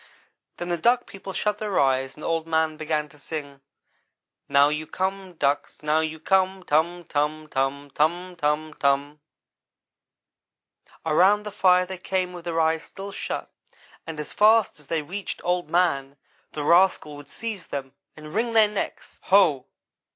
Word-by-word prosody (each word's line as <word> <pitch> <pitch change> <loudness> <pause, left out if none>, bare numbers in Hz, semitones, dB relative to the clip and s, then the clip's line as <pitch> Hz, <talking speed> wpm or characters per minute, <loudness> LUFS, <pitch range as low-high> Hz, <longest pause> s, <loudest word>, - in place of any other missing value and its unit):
"Then 175 - -5
the 175 -1 -1
Duck 240 +6 +3
people 195 0 -9
shut 210 +2 -1
their 210 -3 0
eyes 135 -1 +1
and 150 - -12
Old 165 -1 -1
man 160 -1 +1
began 155 -1 -2
to 150 - -18
sing: 140 -2 -7 0.9
'Now 140 +1 +5
you 150 +1 -3
come, 190 0 -3
ducks, 145 0 -1
now 150 +1 +2
you 160 0 -2
come 190 +2 +1
tum 170 +2 +1
tum, 155 +1 -1
tum; 140 +1 -2
tum 175 +4 0
tum, 155 -1 -1
tum.' 140 +2 +1 1.9
"Around 190 +7 +4
the 210 - -6
fire 185 -2 +4
they 185 0 -7
came 185 -1 -1
with 175 -1 -9
their 165 -1 -1
eyes 160 0 +2
still 200 +1 -9
shut, - - -5 0.5
and 160 -2 -6
as 150 - -6
fast 215 -5 +4
as 150 - -17
they 160 -1 -1
reached 190 +7 -5
Old 175 -2 0
man, 140 -6 +1 0.4
the 150 - -3
rascal 170 -2 +3
would 145 -1 -12
seize 220 +1 -6
them, 135 -1 -5 0.2
and 155 0 -10
wring 230 +3 0
their 220 -2 +6
necks. 210 -1 -5
Ho! 175 -9 +4
160 Hz, 160 wpm, -25 LUFS, 150-190 Hz, 1.9 s, their